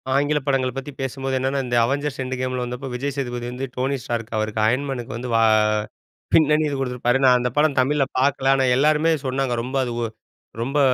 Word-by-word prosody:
ஆங்கில 145 +2 +2
படங்கள 130 -2 +1
பத்தி 135 +2 -5
பேசும்போது 135 0 -2
என்னென்னா, 135 +2 0
இந்த 120 -1 -1
அவெஞ்சர்ஸ் 140 +2 -2
எண்ட் 130 0 -3
கேம்லாம் 130 -1 -2
வந்தப்போ 125 +2 -6
விஜய் 135 +2 -3
சேதுபதி 120 -3 -3
வந்து, 125 +2 -4
டோனி 135 +2 -1
ஸ்டார்க் 115 -1 -4
அவருக்கு 110 0 -1
அயர்ன் 130 +5 +1
மேனுக்கு 120 -4 -4
வந்து 125 +1 -5
வா 115 - +4 0.9
பின்னணி 155 -1 +4
குடுத்திருப்பாரு. 125 -1 0
நான் 125 -1 +6
அந்த 125 0 0
படம் 150 -1 +3
தமிழ்ல 140 +1 +1
பார்க்கல. 135 0 +2
ஆனா, 135 - +2
எல்லாருமே 155 +3 +3
சொன்னாங்க, 130 -1 0
ரொம்ப 130 +3 -3
அது 120 -2 -3
வொ 120 - 0 0.6
ரொம்ப 140 +4 -1
130 Hz, 185 wpm, -22 LUFS, 125-140 Hz, 0.9 s, நான்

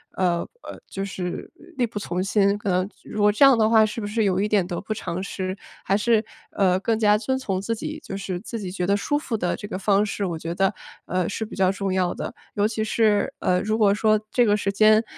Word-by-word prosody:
呃， 175 -2 +1 0.2
呃， - - -9
就 195 - -5
是 180 -2 -5 0.3
力 245 - +2
不 215 - -8
从 180 -1 -3
心。 200 0 +2
可 205 -1 -4
能 185 +1 +1
如 210 - -4
果 210 - +5
这 210 - +3
样 270 -3 +7
的 220 -1 +3
话， 220 -1 +6
是 215 +2 -4
不 205 - -3
是 215 +1 0
有 190 -2 +1
一 205 - +1
点 205 -4 +2
得 175 -1 -4
不 215 - -3
偿 185 -3 -4
失？ 190 -1 -4 0.3
还 195 - +2
是， 220 0 +2 0.3
呃， 185 -2 +2
更 220 +3 0
加 210 -1 +4
遵 260 +4 -1
从 195 -7 -2
自 230 +3 -2
己， 310 +7 -5
就 195 - -5
是 190 -2 -4
自 230 +3 -6
己 185 -3 -5
觉 180 -2 -2
得 200 0 +3
舒 290 +8 0
服 255 -6 -3
的 180 -3 -1
这 205 - -8
个 205 - -4
方 200 +1 +2
式， 205 -1 -3
我 170 -3 -3
觉 165 +1 -4
得， 195 +2 +2 0.3
呃， 185 -1 -1
是 220 +2 -3
比 - - -9
较 190 -1 +3
重 195 -1 -2
要 185 -2 +1
的。 - - -5 0.2
尤 205 0 +3
其 220 0 -2
是， 215 -1 +2
呃， 180 0 +2
如 215 +1 0
果 205 -3 +4
说 215 +1 +3
这 245 -1 +4
个 210 0 +3
时 200 -1 -1
间， 215 +2 +5
205 Hz, 275 characters per minute, -24 LUFS, 185-215 Hz, 0.3 s, 样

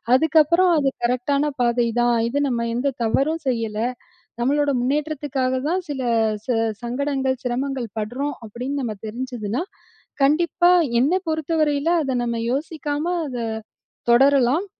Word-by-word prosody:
அதுக்கப்புறம், 320 +5 +4
அது 280 -2 +2 0.2
கரெக்டான 255 +4 +1 0.2
பாதை 240 0 +2
தான். 240 0 +3 0.2
இது 285 +4 0
நம்ம 235 -1 -1
எந்த 270 +3 0
தவறும் 280 +8 +1
செய்யல. 225 -4 -1 0.6
நம்மளோட 285 +4 +2
முன்னேற்றத்துக்காக 280 -1 -1
தான் 365 +3 0
சில 270 -2 -3 0.8
சங்கடங்கள், 265 +1 -1
சிரமங்கள் 255 0 -2
படுறோம். 255 +7 -3
அப்படின்னு 250 +6 -4
நமக்கு 225 -4 -3
தெரிஞ்சுதுன்னா, 240 +1 -3 0.6
கண்டிப்பா 345 +4 +3 0.3
என்னை 330 +9 +2
பொறுத்தவரையில, 310 -1 0 0.2
அத 265 -2 -1
நம்ம 235 -1 -2
யோசிக்காம 295 +1 -2 0.2
அத 250 -3 -5 0.7
தொடரலாம். 270 +5 +4
275 Hz, 115 wpm, -22 LUFS, 245-295 Hz, 0.8 s, அதுக்கப்புறம்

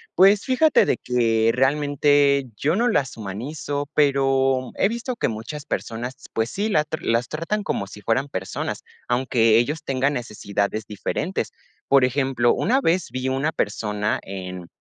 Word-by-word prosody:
Pues 195 +3 +6
fíjate 285 +4 +4
de - - +1
que 115 -2 +2
realmente 145 +1 +3
yo 155 +8 +1
no 235 +4 +2
las 140 - 0
humanizo, 140 +8 -4
pero 135 -2 +2
he 195 - +2
visto 235 +2 -4
que - - 0
muchas 115 +7 -6
personas, 120 +1 -4 0.2
pues 110 +1 0
sí, 210 +3 -1
la 155 -7 +3
tra 155 +1 -5
las 115 +2 +1
tratan 165 +7 -2
como 100 - -2
si 105 - -11
fueran 120 +7 0
personas, 95 -8 -4 0.2
aunque 120 -3 +3
ellos 150 +6 0
tengan 135 0 0
necesidades 105 -3 -3
diferentes. 150 - -3 0.4
Por 135 -2 +5
ejemplo, 130 -2 +1
una 265 +4 +1
vez 175 -2 +1
vi 130 +1 -2
una 135 +4 0
persona 105 -4 -1
en 90 -2 -7
135 Hz, 155 wpm, -23 LUFS, 115-150 Hz, 0.4 s, Pues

